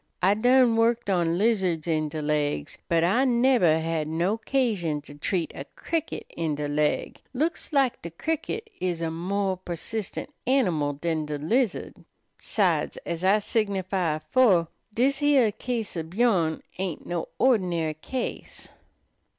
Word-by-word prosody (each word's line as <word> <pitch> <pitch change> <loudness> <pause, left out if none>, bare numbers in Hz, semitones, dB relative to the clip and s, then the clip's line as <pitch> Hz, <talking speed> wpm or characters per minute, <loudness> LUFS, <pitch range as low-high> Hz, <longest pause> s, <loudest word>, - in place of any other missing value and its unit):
I 190 +2 +5
done 245 +1 +4
worked 230 -2 +2
on 170 -2 +1
lizards 190 -7 +1
in 155 -2 0
de 155 0 -4
laigs, 145 - -1
but 165 -1 +3
I 200 +10 +3
nebber 240 -10 +4
had 160 -1 -1
no 170 +6 0
'casion 220 - 0
to 145 - -11
treat 165 +4 -2
a - - -7
cricket 325 -1 -3
in 160 -3 -1
de 145 0 -3
laig. 150 +1 0 0.2
Looks 320 +6 -1
lak 275 -4 +2
de 170 - -6
cricket 325 - -3
is 175 -2 -2
a 165 - -1
more 190 +3 -1
persistent 185 - -5 0.2
animal 175 - +2
dan 155 +1 -2
de 150 -1 -3
lizard. 215 - 0 0.5
'Sides, - - 0
ez 170 +1 -3
I 195 +3 +5
signify 195 -6 0
afore, 170 +2 +3 0.2
dis 265 +6 +1
heah 280 -7 +4
case 230 -2 -4
ob 165 +1 -5
yourn 190 -9 +2 0.2
ain't 185 -5 -3
no 175 -1 -3
ordinary 180 -11 +2
case." 240 - -6
185 Hz, 145 wpm, -26 LUFS, 160-235 Hz, 0.5 s, I